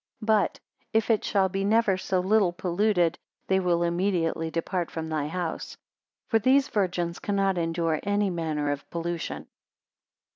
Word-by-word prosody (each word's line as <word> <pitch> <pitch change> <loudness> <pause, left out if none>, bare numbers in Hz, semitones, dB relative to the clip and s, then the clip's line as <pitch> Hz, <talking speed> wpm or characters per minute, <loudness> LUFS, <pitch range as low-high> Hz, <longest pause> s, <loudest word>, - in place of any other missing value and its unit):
But, 215 -5 +2 0.3
if 220 +1 +2
it 220 - +2
shall 195 -2 +2
be 195 +1 -2
never 215 -1 +3
so 185 0 -1
little 195 -1 +3
polluted, 175 0 +1 0.3
they 190 0 +2
will 175 -2 +1
immediately 170 -2 0
depart 170 +1 -2
from 160 -1 -5
thy 155 -2 -1
house; 170 0 -4 0.5
for 225 - +3
these 265 +5 +3
virgins 175 -4 -1
cannot 195 -2 0
endure 165 -1 0
any 205 -1 +1
manner 155 -4 -1
of 140 -1 -5
pollution. 170 0 -4
180 Hz, 145 wpm, -27 LUFS, 165-200 Hz, 0.5 s, never